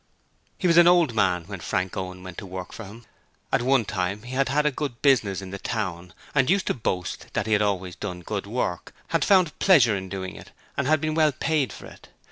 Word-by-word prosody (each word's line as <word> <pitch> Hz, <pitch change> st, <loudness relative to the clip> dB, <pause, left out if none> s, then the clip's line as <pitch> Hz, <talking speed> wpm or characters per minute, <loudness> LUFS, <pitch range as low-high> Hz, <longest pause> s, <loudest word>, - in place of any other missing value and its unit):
He -, -, -4 dB
was 170 Hz, -1 st, +4 dB
an 175 Hz, 0 st, +8 dB
old 175 Hz, -7 st, +5 dB
man 90 Hz, -5 st, +2 dB
when -, -, -8 dB
Frank 90 Hz, 0 st, -2 dB
Owen 90 Hz, 0 st, -5 dB
went 95 Hz, -2 st, -8 dB
to -, -, -8 dB
work 95 Hz, 0 st, -7 dB
for 115 Hz, -, -8 dB
him. 110 Hz, +4 st, -12 dB, 0.5 s
At -, -, +3 dB
one 130 Hz, -2 st, +3 dB
time 100 Hz, 0 st, -2 dB
he 125 Hz, +2 st, -8 dB
had 135 Hz, 0 st, +1 dB
had 150 Hz, +2 st, +1 dB
a 150 Hz, -, +3 dB
good 135 Hz, -4 st, -4 dB
business 105 Hz, -9 st, +3 dB
in 95 Hz, -, -8 dB
the 100 Hz, -, -6 dB
town, 90 Hz, -6 st, -4 dB, 0.2 s
and 135 Hz, -1 st, +3 dB
used 195 Hz, +1 st, +2 dB
to -, -, +1 dB
boast 90 Hz, -7 st, -3 dB
that -, -, -1 dB
he 110 Hz, -, +1 dB
had 105 Hz, -, +3 dB
always 95 Hz, -3 st, -1 dB
done 90 Hz, -4 st, -5 dB
good 100 Hz, +2 st, -4 dB
work, 100 Hz, -6 st, -3 dB
had -, -, +1 dB
found 185 Hz, -6 st, +3 dB
pleasure 130 Hz, -, +5 dB
in 95 Hz, -1 st, -5 dB
doing 95 Hz, -1 st, -5 dB
it -, -, -12 dB, 0.3 s
and 140 Hz, -, -1 dB
had 155 Hz, -1 st, +3 dB
been 155 Hz, 0 st, -1 dB
well 155 Hz, -1 st, +3 dB
paid 145 Hz, 0 st, 0 dB
for -, -, -10 dB
it. -, -, -14 dB
110 Hz, 240 wpm, -25 LUFS, 95-140 Hz, 0.5 s, an